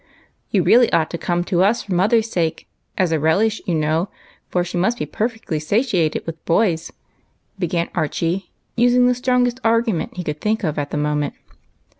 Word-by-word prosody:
" - - -44
You - - +2
really 240 0 +5
ought 160 -2 +1
to 170 - -4
come 175 -1 0
to 175 0 0
us 205 +5 +2
for 195 - -4
mother's 215 +5 +3
sake, 165 -6 -2 0.3
as 185 -3 +2
a 160 - +1
relish, 200 +9 +2
you 175 - +1
know, 160 +4 0 0.4
for 180 - +1
she 180 +1 -6
must 195 +7 +1
be - - -2
perfectly 225 -8 -3
satiated 180 - 0
with 165 -1 -7
boys," 170 -2 +1 0.7
began 170 -1 -1
Archie, 170 +4 -1 0.3
using 245 +1 +4
the 250 - +4
strongest 250 0 +1
argu 230 -1 +2
ment 170 - -4
he 180 - -3
could 150 -2 -4
think 215 +1 0
of 155 -4 -1
at 145 0 -3
the - - -3
moment. 150 -1 -1
180 Hz, 190 wpm, -20 LUFS, 160-225 Hz, 0.7 s, really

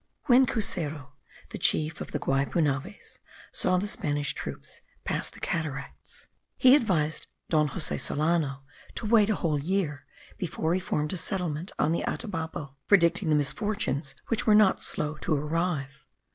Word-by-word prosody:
When 260 -1 +6
Cuseru, 160 - -2 0.4
the - - -6
chief 155 0 +1
of - - -5
the - - -1
Guaypunaves, 140 +5 -1 0.3
saw 185 - +1
the 185 - 0
Spanish 145 -7 -1
troops - - -7 0.2
pass - - -2
the - - -15
cataracts, 145 -4 -5 0.3
he 255 0 +7
advised 170 - 0 0.2
Don 155 -2 +3
Jose 150 +2 -2
Solano 150 -3 0 0.3
to - - -1
wait 215 -1 +5
a 215 - +2
whole 155 -6 0
year 150 -4 -2 0.3
before 165 -2 -1
he 185 - +1
formed 150 -3 -2
a - - -2
settlement 175 -2 -3
on 150 - +2
the 170 - 0
Atabapo; 160 -7 -4
predicting 175 -2 +4
the 155 - +4
misfortunes 150 -2 -1
which 230 -1 -1
were 215 - +7
not 210 -3 +5
slow 150 0 -2
to 155 - 0
arrive. 150 -2 -2
160 Hz, 150 wpm, -28 LUFS, 145-195 Hz, 0.4 s, he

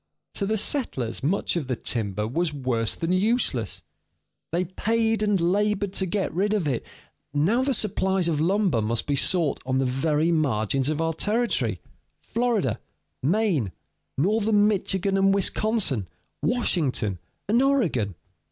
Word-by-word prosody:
To 200 - -2
the 220 +1 +1
settlers 195 - -1
much 170 +8 0
of 160 -6 -2
the 130 - -1
timber 105 -3 -2
was 165 +7 -1
worse 125 -5 0
than 165 +1 -2
useless; 185 - 0 0.7
they 175 +3 0
paid 225 +4 0
and 205 -2 +2
labored 200 +3 +1
to 190 -1 -1
get 195 +2 -1
rid 205 +5 +1
of 185 -7 0
it; 130 -5 -1 0.5
now 190 - +3
the 265 0 +1
supplies 190 -3 +1
of 155 -3 0
lumber 185 - +2
must 110 +2 -1
be 145 - 0
sought 160 +1 +1
on 130 0 -1
the 135 - +1
very 150 +5 +1
margins 135 -3 +1
of 155 +1 -1
our 165 0 0
territory: 185 - 0 0.4
Florida, 220 - 0 0.4
Maine, 160 - +1 0.4
northern 210 +5 +3
Michigan 195 -1 0
and 195 0 +4
Wisconsin, 200 - 0 0.3
Washington, 140 - 0 0.3
and 230 +5 +3
Oregon. 175 - +1
175 Hz, 145 wpm, -25 LUFS, 130-210 Hz, 0.7 s, and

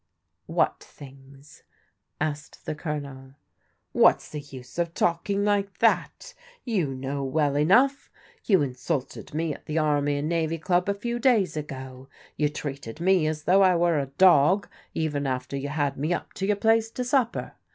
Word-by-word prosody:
What - - +1
things? 135 +1 -15 0.3
" - - -52
asked 150 -1 -4
the - - -2
Colonel. 140 -4 -6 0.6
What's - - +4
the 150 - -4
use 130 0 -10
of 170 -1 -1
talking 200 +4 0
like 200 -1 0
that? - - +1 0.3
You 180 - -1
know 135 +2 -3
well 145 +1 0
enough. 245 - +3 0.3
You 190 -8 +3
insulted 130 +2 -4
me 160 -1 -1
at - - -14
the 155 - -2
Army 145 -2 +1
and 145 +1 -2
Navy 165 -1 0
Club 180 +3 +1
a 200 - +1
few 235 +4 -3
days 220 - +3
ago. 130 -3 -7 0.3
You 150 -1 +1
treated 140 -4 -6
me 180 -2 +3
as 155 -1 -3
though 190 +4 +4
I 185 -2 +5
were 170 -2 +2
a 140 - -2
dog, 180 +5 +4 0.3
even 145 -3 -1
after 130 +1 -3
you 140 +1 -3
had 145 -2 -1
me 155 +5 0
up - - -8
to 195 - -3
your 210 - +3
place 225 +2 +2
to 250 - -4
supper. 245 -2 0
155 Hz, 170 wpm, -26 LUFS, 140-190 Hz, 0.6 s, I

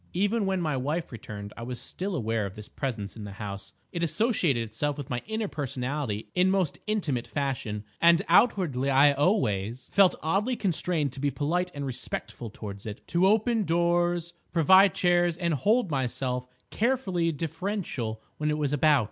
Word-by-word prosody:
"Even 205 +3 +1
when 190 -1 +1
my 155 -5 0
wife 150 +6 -2
returned 105 -3 -8
I - - -9
was 120 0 -5
still 185 +9 -4
aware 115 -6 -1
of 95 - -10
this 105 -1 -9
Presence 110 -7 -4
in 110 - -8
the 100 -1 -7
house; 100 -1 -7 0.2
it 170 - -4
associated 170 - +1
itself 125 +7 -2
with 140 -3 -7
my 120 -1 -1
inner 220 -1 -2
personality 130 - -3
in 180 +1 +3
most 190 -5 0
intimate 160 - -1
fashion; 130 -7 -2 0.2
and 170 0 +6
outwardly 165 - +3
I 140 +2 +6
always 125 - 0
felt 195 -2 +5
oddly 200 +10 +1
constrained 170 - 0
to 135 - -9
be 145 +1 +1
polite 155 +7 -1
and 140 -1 -3
respectful 120 -2 -4
towards 100 -1 -8
it—to 170 - 0
open 220 +2 +3
doors, 175 0 +1 0.2
provide 190 +3 +6
chairs 175 -1 +2
and 170 -2 0
hold 205 - +2
myself 125 -1 -2 0.2
carefully 200 -9 +1
deferential 155 - -3
when 150 0 -1
it 150 - 0
was 145 -2 -1
about. 145 0 +4
150 Hz, 165 wpm, -27 LUFS, 125-180 Hz, 0.2 s, and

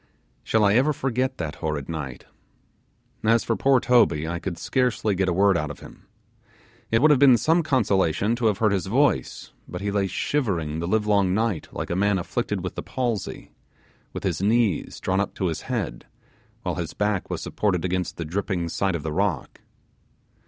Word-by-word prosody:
Shall 110 -1 +2
I 100 - +4
ever 135 +7 +3
forget 130 -1 -1
that 80 -3 -4
horrid 75 -4 -2
night! 75 -7 -6 1.0
As 115 +1 +3
for 115 - 0
poor 135 +1 +3
Toby, 115 -12 +3
I 85 +1 -3
could 85 0 -5
scarcely 125 -2 0
get 95 0 0
a - - +1
word 100 +1 +4
out 75 -3 -1
of 75 - -9
him. - - -14 0.8
It 115 +3 +2
would 155 - +7
have 145 - +4
been 130 -3 +7
some 160 +9 +3
consolation 105 - +1
to 120 -2 +1
have 105 -3 +1
heard 110 -2 +2
his 95 -2 -1
voice, 115 - 0 0.2
but 90 - -6
he 100 +1 -2
lay 100 -1 +1
shivering 90 - -1
the 85 - -3
live 105 +3 +1
long 100 -3 +2
night 110 -6 -1
like - - -5
a - - 0
man 100 +1 +2
afflicted 85 - -2
with - - -4
the - - -5
palsy, 120 -6 -3 0.6
with - - -7
his - - -1
knees 110 -3 +1
drawn 95 +1 0
up 100 - -2
to 95 - -2
his 80 -3 -2
head, 100 - -3 0.6
while - - -1
his 80 -1 -6
back 105 -2 -1
was - - -3
supported 95 -5 -1
against 90 0 -2
the 85 - -4
dripping 90 0 -2
side 95 +2 0
of 80 - -4
the 80 -1 -3
rock. 95 -6 -2
100 Hz, 195 wpm, -24 LUFS, 85-115 Hz, 1.0 s, would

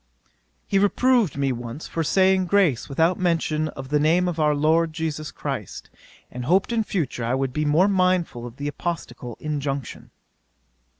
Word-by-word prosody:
'He 195 - +1
reproved 220 - +2
me 140 -1 +1
once 120 +4 -6
for 165 - -2
saying 190 +2 +3
grace 175 -12 +2
without 165 +6 +1
mention 160 -3 0
of 135 -3 -8
the 150 0 +2
name 170 +5 +3
of 170 -2 -3
our 150 -1 +3
LORD 160 +2 +2
JESUS 155 -2 -3
CHRIST, - - -6 0.4
and 125 0 -6
hoped 190 - +2
in 230 -1 +1
future 155 - -3
I 120 +2 0
would 135 -1 -2
be 150 0 -1
more 155 +6 +4
mindful 185 -10 +1
of 120 - -11
the 145 +1 -5
apostolical 145 -7 -5
injunction. 140 -3 -4
155 Hz, 165 wpm, -23 LUFS, 140-180 Hz, 0.4 s, more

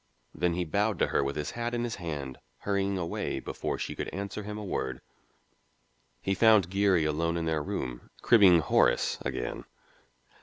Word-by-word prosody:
Then 85 +1 0
he 90 0 -1
bowed 100 +6 0
to - - +3
her - - +1
with 70 +1 -2
his 75 -1 -3
hat 120 0 -3
in 120 - -1
his 120 -1 -3
hand, 75 -7 -5 0.2
hurrying 100 -1 0
away 85 -2 -2
before - - -4
she - - -4
could - - -4
answer 100 +1 -5
him 105 +1 -6
a 105 - -6
word. 65 -8 -3 1.2
He 95 - +1
found 105 -3 +5
Geary 95 -4 +3
alone 85 +2 0
in 85 - -2
their 80 -1 0
room, 60 -4 -5
cribbing 95 -8 +7
"'Horace" - - +2
again. - - -4
90 Hz, 175 wpm, -29 LUFS, 80-100 Hz, 1.2 s, cribbing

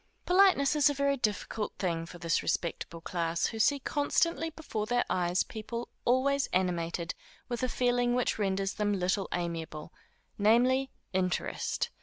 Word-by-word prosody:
_ - - -42
Politeness 360 -7 +5
is 295 0 +5
a 290 - -1
very 280 0 +2
difficult 215 -2 -2
thing 165 -3 -2
for 175 - -10
this 165 -1 0
respectable 170 0 -2
class, 170 -1 -1
who 225 - -3
see 280 +6 +4
constantly 320 +4 0
before 260 -10 -4
their 245 +1 +2
eyes 180 0 +2
people 230 +2 -6 0.2
always 275 +3 +2
animated 170 -2 -1 0.4
with 240 -1 -3
a 255 - 0
feeling 245 -1 +1
which 250 -3 0
renders 195 -1 0
them 205 -1 0
little 190 +1 0
amiable, 165 -3 -4 0.5
namely, 250 +5 +4 0.2
interest. 185 -1 -1
215 Hz, 150 wpm, -30 LUFS, 180-260 Hz, 0.5 s, Politeness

